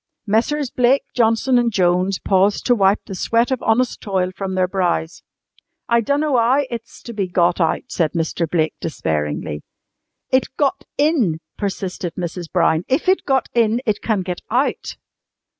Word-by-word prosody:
Messrs. 240 +6 0
Blake, 250 +2 +3
Johnson 235 +2 +3
and 235 -1 +1
Jones 180 0 +2
paused 195 +1 +1
to 245 - +4
wipe 200 -2 +3
the 195 - -7
sweat 230 +6 +1
of 255 -1 -1
honest 240 +2 +1
toil 185 -3 -1
from 190 -1 -4
their 185 -1 +2
brows. 175 -3 -1 0.7
"I 235 0 +3
dunno 285 +3 +1
'ow 250 +5 +3
it's 235 -1 -8
to 235 - -8
be 200 -3 -2
got 175 0 +1
out," 160 - +1
said 160 -4 0
Mr. 165 -1 -1
Blake 160 -2 +1
despairingly. 75 - -3 0.7
"It 260 0 +3
got 290 +5 0
in!" 280 - +2 0.2
persisted 190 -3 -4
Mrs. 175 -1 -5
Brown. 165 -2 +2
"If 270 +7 0
it 375 +1 +2
got 270 -2 +1
in 230 -1 +2
it 215 -3 0
can 210 -5 0
get 180 -1 -5
out." 255 +5 -1
205 Hz, 160 wpm, -20 LUFS, 180-245 Hz, 0.7 s, to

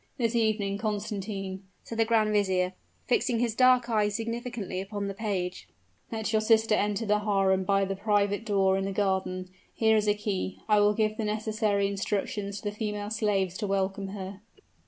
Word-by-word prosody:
"This 230 -3 0
evening, 210 -3 +1
Constantine," 200 -3 -3 0.2
said 230 - -7
the 225 - +5
grand 220 -2 +2
vizier, 190 -3 +1 0.3
fixing 250 - +1
his 235 -1 0
dark 255 0 +5
eyes 210 -3 +1
significantly 230 -4 -3
upon 200 +1 -4
the 195 - -3
page, 190 -4 -3 0.4
"let 220 -1 -2
your 215 - +3
sister 220 0 +4
enter 210 +1 +1
the 210 0 +2
harem 195 -2 +2
by 195 0 +3
the 195 0 -3
private 205 +1 +1
door 195 -3 +2
in 195 - -2
the 195 - -2
garden. 190 -2 -1 0.3
Here 220 -1 +4
is 210 -1 +2
a 205 - +4
key; 200 -3 -3
I 210 -1 +5
will 205 0 +4
give 215 0 0
the 225 - -2
necessary 215 -1 0
instructions 200 0 -2
to 205 - -2
the - - -14
female 210 -1 -3
slaves 195 -4 0
to 210 - -2
welcome 195 0 -1
her." 195 0 -7
205 Hz, 180 wpm, -28 LUFS, 195-220 Hz, 0.4 s, the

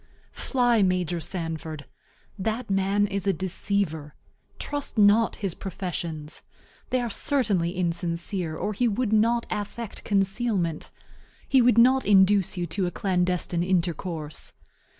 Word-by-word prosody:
Fly 245 -4 +2
Major 180 -2 +1
Sanford. 160 -3 -5 0.5
That 220 +3 -2
man 195 +1 +2
is 200 -1 -3
a 195 - +4
deceiver. 185 -5 -2 0.4
Trust 290 -4 -4
not 210 +2 +5
his 195 -5 -3
professions. 165 -5 -5 0.5
They 255 - +1
are 240 - -2
certainly 200 - +1
insincere, 170 -1 -2
or 210 - -2
he 240 +4 +1
would 225 0 0
not 230 +2 +3
affect 210 +1 -5
concealment; 195 -4 0 0.6
he 265 -2 +5
would 240 -2 +4
not 260 +3 +5
induce 195 -1 +4
you 175 - -1
to 180 +3 -2
a - - -3
clandestine 180 -2 0
intercourse. 170 -4 -2
190 Hz, 125 wpm, -26 LUFS, 170-215 Hz, 0.6 s, not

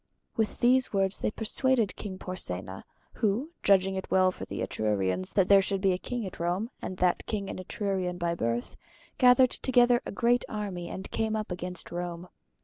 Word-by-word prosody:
With 220 -2 -1
these 255 +2 +4
words 195 -1 0
they - - 0
persuaded 225 +1 0
King 190 -3 -6
Porsenna, 95 - -5 0.3
who 230 +8 0
judging 195 -1 +4
it 190 0 -5
well 185 0 +4
for - - -8
the - - -5
Etrurians 95 -4 -1
that 190 -2 +4
there 200 -1 +7
should 195 0 0
be 190 0 +3
a 180 - -2
king 245 0 -4
at 190 - -8
Rome, 180 +8 -1
and 185 - -5
that 180 -1 +2
king 200 -3 -3
an - - -6
Etrurian 185 -1 -2
by 170 -1 0
birth, 115 -6 -2 0.4
gathered 255 0 +6
together 245 -2 +3
a - - -6
great 240 +4 +2
army 195 -5 -4
and 190 - -7
came 220 -1 0
up 215 -2 -3
against 180 0 -5
Rome. 175 0 -5
195 Hz, 185 wpm, -28 LUFS, 180-220 Hz, 0.4 s, there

